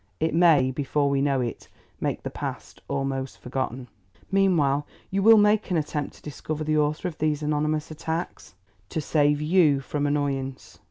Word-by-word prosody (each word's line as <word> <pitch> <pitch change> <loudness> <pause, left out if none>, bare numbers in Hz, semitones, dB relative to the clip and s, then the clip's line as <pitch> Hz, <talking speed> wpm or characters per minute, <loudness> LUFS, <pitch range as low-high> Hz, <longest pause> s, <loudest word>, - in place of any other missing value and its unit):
It 160 - 0
may, 160 -6 +5
before 140 +1 0
we 135 -1 +1
know 140 -2 +1
it, 120 -2 -5 0.3
make - - -2
the - - -4
past - - -7
almost 135 -1 -3
forgotten." 130 0 -4 0.4
"Meanwhile 155 -8 +2 0.2
you 195 +1 0
will 225 +2 +8
make 210 +1 +3
an 180 - +1
attempt 150 -2 -3
to - - -18
discover 155 +1 -5
the 155 0 +1
author 150 +4 0
of 165 - -7
these 155 -1 0
anonymous 150 +1 -1
attacks?" 160 - -5 0.3
"To - - -2
save 145 -1 +2
YOU 155 -3 +4
from 145 +2 -2
annoyance." 135 -2 -3
150 Hz, 165 wpm, -25 LUFS, 140-160 Hz, 0.4 s, will